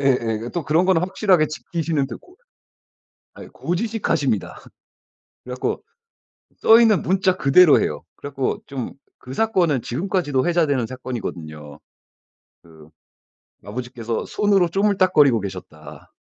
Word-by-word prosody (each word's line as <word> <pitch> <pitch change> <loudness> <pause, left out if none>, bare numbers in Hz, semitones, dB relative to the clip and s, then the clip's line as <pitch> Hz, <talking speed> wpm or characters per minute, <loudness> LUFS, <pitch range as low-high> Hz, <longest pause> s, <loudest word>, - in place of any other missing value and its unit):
예예. 135 -2 +3 0.3
예 - - -4
또 170 -4 -2
그런 160 +4 +2
건 190 -3 +4
확실하게 180 -2 +2
지키시는 155 -2 -3
드 - - -7
고 360 - -22 1.0
아이 - - -11
고지식하십니다. 175 - -2 0.9
그래 125 - -7
갖고 125 - -3 0.8
써 225 +1 +6
있는 220 -4 +4
문자 185 0 +1
그대로 150 +4 +6
해요. - - -3
그래 145 - -8
갖고 135 -1 -2
좀 135 -4 -6 0.3
그 130 +1 -8
사건은 175 - +1
지금까지도 145 - -1
회자되는 155 -8 +1
사건이거든요. 80 - -7 0.9
그 80 -2 -17 0.8
아버지께서 115 +1 -5
손으로 200 -4 +2
쪼물딱거리고 185 - +3
계셨다. 90 -6 -10
145 Hz, 305 characters per minute, -21 LUFS, 125-185 Hz, 1.0 s, 써